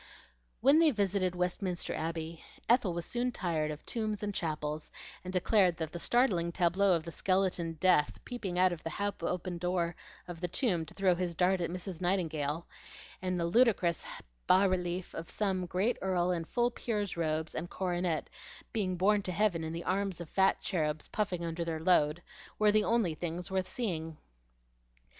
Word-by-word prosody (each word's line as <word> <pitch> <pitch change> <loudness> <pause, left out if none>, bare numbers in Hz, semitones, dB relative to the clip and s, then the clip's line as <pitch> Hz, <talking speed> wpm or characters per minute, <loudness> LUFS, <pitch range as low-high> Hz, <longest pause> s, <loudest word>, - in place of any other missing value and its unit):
When 275 +5 +6
they 330 -1 +6
visited 200 -6 0
Westminster 180 0 -2
Abbey, 165 0 -4 0.2
Ethel 235 -6 +4
was 170 -1 -3
soon 245 +1 -1
tired 165 -8 -1
of 150 0 -7
tombs 215 -3 -2
and 205 0 -2
chapels, 155 -3 -3 0.3
and 185 - -5
declared 185 -1 +3
that 160 -2 -3
the 170 - -5
startling 185 -7 +2
tableau 185 +3 +3
of 165 -2 +1
the 170 - -7
skeleton 185 -3 0
Death 165 -3 +2
peeping 205 -8 -4
out 185 0 +5
of 165 - -7
the 165 - -4
half 200 +4 -3
opened 180 -1 -2
door 175 -1 0 0.3
of 175 -2 -8
the 180 - 0
tomb 175 - 0
to - - -12
throw 190 -2 +3
his 175 -1 -2
dart 180 +2 +2
at 170 - -1
Mrs. 180 0 -6
Nightingale, 165 -4 0 0.6
and 185 -1 -1
the 170 - +1
ludicrous 185 -3 +3
has - - -8 0.5
relief 180 0 -2
of 165 - -6
some 190 -4 -1
great 190 +8 +1
earl 180 -1 +1
in 170 -2 -1
full 240 +6 +1
peer's 210 -5 -2
robes 160 -1 -1
and 175 +2 -4
coronet 175 -3 -1 0.5
being 190 -5 0
borne 205 +3 +3
to 185 - -3
heaven 180 -4 +1
in 160 - -3
the 170 +1 -4
arms 195 -1 -1
of 170 - -6
fat 190 0 +3
cherubs 155 -5 -1
puffing 185 -5 -1
under 165 +1 -2
their 165 -1 -3
load, 160 -1 +3 0.3
were 210 -1 +5
the 215 0 +4
only 220 -7 +2
things 175 +3 -4
worth 190 -1 -1
seeing. 165 -9 -3
180 Hz, 180 wpm, -32 LUFS, 170-195 Hz, 0.6 s, When